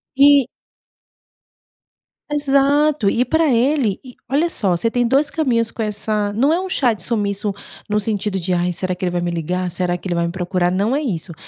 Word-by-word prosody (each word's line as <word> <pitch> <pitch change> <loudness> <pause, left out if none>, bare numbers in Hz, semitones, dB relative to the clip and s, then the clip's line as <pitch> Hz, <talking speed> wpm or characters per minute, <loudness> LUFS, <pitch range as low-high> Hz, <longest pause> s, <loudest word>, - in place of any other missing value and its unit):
E 280 -1 +6 1.8
Exato, 285 -3 +2
e 240 +5 +1
pra 320 +3 +2
ele 245 -3 +1
e 250 - -12 0.2
olha 315 +5 +2
só, 190 - 0
você 230 +7 0
tem 245 +1 0
2 275 +5 +2
caminhos 240 -8 +1
com 230 - -6
essa 210 0 -2
não 265 +9 +2
é 340 - +1
um 380 - -5
chá 255 -9 +2
de 195 -5 -8
sumiço 205 -2 -1 0.4
no 210 0 +1
sentido 205 -2 -2
de, 180 +1 -2
"Ai 175 0 0
será 185 +1 -3
que 180 - -9
ele 180 - 0
vai 175 - -1
me 175 0 -2
ligar? 180 +2 -2
Será 175 0 -1
que 185 - -8
ele 175 - -1
vai 170 0 0
me - - -3
procurar?" 180 0 -1
Não 205 +7 +1
é 295 - 0
isso, 180 - -4
215 Hz, 205 wpm, -19 LUFS, 185-275 Hz, 1.8 s, E